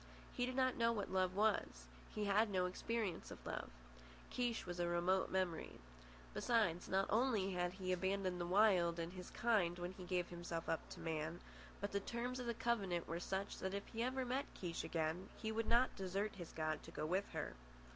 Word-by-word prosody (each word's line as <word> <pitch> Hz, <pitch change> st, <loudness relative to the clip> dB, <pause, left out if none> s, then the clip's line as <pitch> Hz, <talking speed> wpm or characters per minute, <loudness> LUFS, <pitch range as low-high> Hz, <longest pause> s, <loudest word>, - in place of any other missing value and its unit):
He 245 Hz, -, 0 dB
did 255 Hz, -, -3 dB
not 260 Hz, -1 st, +3 dB
know 230 Hz, 0 st, +4 dB
what 205 Hz, -4 st, -2 dB
love 185 Hz, -1 st, +2 dB
was. 205 Hz, -, +2 dB, 0.3 s
He 210 Hz, -, 0 dB
had 210 Hz, +2 st, +4 dB
no 185 Hz, -2 st, +2 dB
experience 200 Hz, 0 st, -2 dB
of -, -, -10 dB
love. -, -, -3 dB, 0.6 s
Kiche 240 Hz, -2 st, 0 dB
was 175 Hz, -1 st, -4 dB
a 175 Hz, -, +2 dB
remote 175 Hz, +2 st, +2 dB
memory. 185 Hz, -4 st, -1 dB, 0.6 s
Besides, 180 Hz, -, +2 dB
not 195 Hz, +1 st, +3 dB
only 220 Hz, -4 st, +3 dB
had 180 Hz, -1 st, 0 dB
he 185 Hz, -1 st, -2 dB
abandoned 185 Hz, 0 st, 0 dB
the 175 Hz, -, -1 dB
Wild 180 Hz, -3 st, +5 dB
and 170 Hz, +1 st, -3 dB
his 180 Hz, -1 st, -7 dB
kind 200 Hz, -7 st, +2 dB
when 175 Hz, +1 st, -3 dB
he 185 Hz, 0 st, -9 dB
gave 180 Hz, -1 st, 0 dB
himself 170 Hz, -1 st, -4 dB
up 165 Hz, -, -1 dB
to -, -, -8 dB
man, 160 Hz, +1 st, -2 dB, 0.4 s
but 200 Hz, +1 st, -2 dB
the 200 Hz, -, +1 dB
terms 240 Hz, +5 st, -3 dB
of 250 Hz, -, -3 dB
the 235 Hz, -, 0 dB
covenant 195 Hz, -8 st, 0 dB
were 165 Hz, +1 st, -2 dB
such 195 Hz, +2 st, -2 dB
that 190 Hz, +1 st, -2 dB
if 200 Hz, +2 st, -6 dB
ever 255 Hz, +3 st, 0 dB
he -, -, -1 dB
met 260 Hz, +3 st, -1 dB
Kiche 170 Hz, -3 st, -3 dB
again 165 Hz, +3 st, -1 dB
he 220 Hz, -1 st, -2 dB
would 225 Hz, 0 st, 0 dB
not 240 Hz, +2 st, +4 dB
desert 195 Hz, +2 st, -1 dB
his 175 Hz, -3 st, -7 dB
god 155 Hz, -1 st, -1 dB
to -, -, -10 dB
go -, -, -3 dB
with 185 Hz, +5 st, +1 dB
her. -, -, -2 dB
190 Hz, 205 wpm, -40 LUFS, 175-220 Hz, 0.6 s, Wild